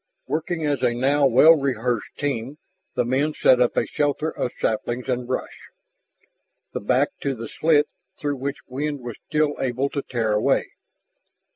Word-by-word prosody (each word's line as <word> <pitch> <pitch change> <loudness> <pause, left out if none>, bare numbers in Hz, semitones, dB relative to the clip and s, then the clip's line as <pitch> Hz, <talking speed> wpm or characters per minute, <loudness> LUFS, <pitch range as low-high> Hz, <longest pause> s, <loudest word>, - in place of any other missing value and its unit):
Working 160 +1 -2
as 145 -3 0
a 120 - +2
now 140 +3 +3
well 145 +6 +7
rehearsed 125 -5 -2
team, 140 -1 -3 0.4
the - - +1
men 140 +5 0
set 125 -1 +5
up 125 - +2
a - - +3
shelter 150 +2 -1
of 125 - -3
saplings 120 +3 -1
and 125 -1 -1
brush, 130 - -5 1.0
the - - -2
back 130 +7 +2
to 140 -1 -1
the 115 -1 -6
slit 150 +1 +3 0.3
through 145 -1 -2
which 140 +2 -5
wind 145 +2 -3
was 120 -2 -7
still 150 -1 +1
able 130 +2 0
to 140 - -2
tear 115 -5 -1
a 105 - +2
way. - - +1
135 Hz, 165 wpm, -23 LUFS, 125-145 Hz, 1.0 s, well